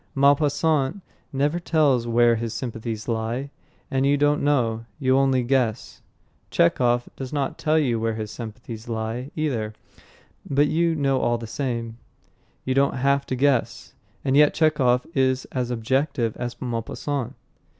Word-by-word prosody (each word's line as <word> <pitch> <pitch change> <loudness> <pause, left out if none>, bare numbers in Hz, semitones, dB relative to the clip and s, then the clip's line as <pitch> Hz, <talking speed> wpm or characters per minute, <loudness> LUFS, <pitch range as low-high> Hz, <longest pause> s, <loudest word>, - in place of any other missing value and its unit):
Maupassant 145 +4 +2 0.3
never 145 +5 0
tells 145 -8 +2
where 120 0 +4
his 115 0 -4
sympathies 115 -3 -5
lie, 115 +4 -2 0.4
and 135 0 +1
you 140 +1 +3
don't 145 +1 +2
know; 115 -6 +1
you 130 -1 +2
only 135 -2 +3
guess. 125 -2 -1 0.5
Chekhov 120 +6 +2
does 130 -2 -6
not 145 -2 -2
tell 155 0 +2
you 125 -7 +1
where 115 0 -1
his 110 -1 -5
sympathies 115 0 -8
lie, 115 +3 -3
either, 120 -9 -2 0.8
but 140 +1 +3
you 165 +2 +1
know 135 -3 +1
all 120 -1 +1
the 115 - -7
same; 115 -1 -4 0.7
you 130 - 0
don't 140 +1 +2
have 140 +2 +1
to 130 - -1
guess. 135 -1 0 0.3
And 135 0 +2
yet 150 0 +5
Chekhov 140 -6 +2
is 130 -1 +1
as 125 -2 -2
objective 120 0 0
as 120 0 -5
Maupassant. 125 +2 -3
130 Hz, 145 wpm, -24 LUFS, 115-140 Hz, 0.8 s, yet